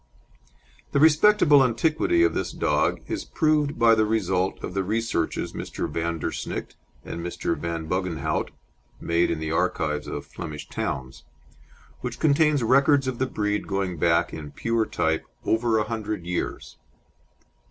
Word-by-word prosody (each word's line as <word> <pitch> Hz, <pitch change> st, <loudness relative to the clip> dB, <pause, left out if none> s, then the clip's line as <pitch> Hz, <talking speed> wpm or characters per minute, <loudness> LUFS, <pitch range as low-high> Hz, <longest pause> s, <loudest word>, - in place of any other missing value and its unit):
The 140 Hz, -, +3 dB
respectable 155 Hz, -1 st, +6 dB
antiquity 160 Hz, -, +2 dB
of 365 Hz, -, +3 dB
this -, -, -2 dB
dog -, -, 0 dB
is 330 Hz, -1 st, -3 dB
proved 155 Hz, -2 st, +1 dB
by 115 Hz, -1 st, +6 dB
the 110 Hz, -1 st, +3 dB
result 95 Hz, -4 st, 0 dB
of -, -, -5 dB
the 95 Hz, 0 st, 0 dB
researches 110 Hz, -4 st, -1 dB
Mr. -, -, -4 dB
Van 85 Hz, 0 st, -2 dB
der 75 Hz, -, -3 dB
Snickt -, -, -5 dB, 0.3 s
and 85 Hz, -, -5 dB
Mr. 85 Hz, -, -2 dB
Van 80 Hz, +1 st, -4 dB
Buggenhoudt 90 Hz, -4 st, -1 dB, 0.5 s
made 85 Hz, +1 st, +1 dB
in 85 Hz, -, -1 dB
the 80 Hz, 0 st, -3 dB
archives 75 Hz, -2 st, 0 dB
of -, -, -5 dB
Flemish 75 Hz, -1 st, -7 dB
towns, 65 Hz, -1 st, -4 dB, 0.8 s
which -, -, -5 dB
contain 150 Hz, 0 st, +4 dB
records 135 Hz, +2 st, +4 dB
of 130 Hz, -2 st, -3 dB
the 130 Hz, -, +1 dB
breed 105 Hz, -3 st, -2 dB
going 95 Hz, -3 st, -2 dB
back 85 Hz, 0 st, +2 dB
in 75 Hz, -2 st, -7 dB
pure 115 Hz, +9 st, -1 dB
type 80 Hz, 0 st, 0 dB, 0.2 s
over 115 Hz, 0 st, +2 dB
a 110 Hz, -, +2 dB
hundred 105 Hz, -4 st, -4 dB
years. 90 Hz, 0 st, -4 dB
105 Hz, 150 wpm, -25 LUFS, 85-135 Hz, 0.8 s, respectable